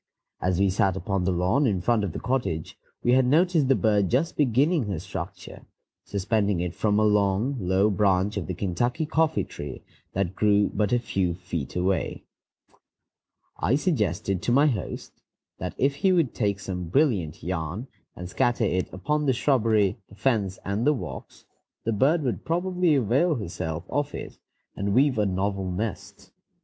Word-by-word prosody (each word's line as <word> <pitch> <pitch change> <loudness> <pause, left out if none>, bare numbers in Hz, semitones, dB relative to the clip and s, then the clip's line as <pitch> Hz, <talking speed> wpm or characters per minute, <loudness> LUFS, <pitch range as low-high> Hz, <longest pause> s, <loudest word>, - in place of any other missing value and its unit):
As 90 0 0
we 100 -1 +3
sat 95 0 +1
upon 95 -2 -1
the 95 - +2
lawn 90 +11 +2
in 100 -5 +1
front 110 +3 +1
of 100 - -2
the - - -5
cottage, 115 -11 -2 0.3
we 120 - +3
had 130 +1 +5
noticed 160 0 +3
the 135 - +4
bird 105 -5 +2
just 140 +7 +1
beginning 145 +2 +2
her 100 -4 -2
structure, - - -8 0.4
suspending 100 -1 0
it 90 0 -2
from 105 +1 +1
a 110 - +3
long, 105 +5 +2
low 95 +2 +2
branch 100 0 +2
of 100 - -3
the 95 - -3
Kentucky 120 - -1
coffee 160 +1 +1
tree 70 -3 -8 0.3
that 95 -1 -1
grew 105 0 +2
but 105 -1 0
a 125 - +4
few 95 -7 -1
feet 85 -6 -5
away. 95 +2 -1 1.4
I 125 - +2
suggested 105 - 0
to - - 0
my 140 +4 +5
host 120 -11 -3 0.4
that - - -4
if 140 +1 +1
he 190 +6 +3
would 170 -8 +2
take 100 -3 0
some 90 -2 -4
brilliant 100 - +1
yarn 85 +5 -3 0.3
and 90 - -7
scatter 120 +6 +1
it 95 -3 0
about - - -10
upon 150 0 +1
the 130 - +4
shrubbery, 115 -6 +2
the 100 - -14
fence, 100 -4 0
and 100 +3 -1
the 150 - +5
walks, 135 - -8 0.4
the 115 - 0
bird 145 +9 +2
would 125 -4 -2
probably 180 -1 +1
avail 140 - +2
herself 85 - -4
of 145 0 -2
it, - - -8 0.4
and 100 +1 -1
weave 130 -2 +3
a 105 - +2
novel 95 0 -1
nest. 105 +4 -5
105 Hz, 175 wpm, -26 LUFS, 95-135 Hz, 1.4 s, had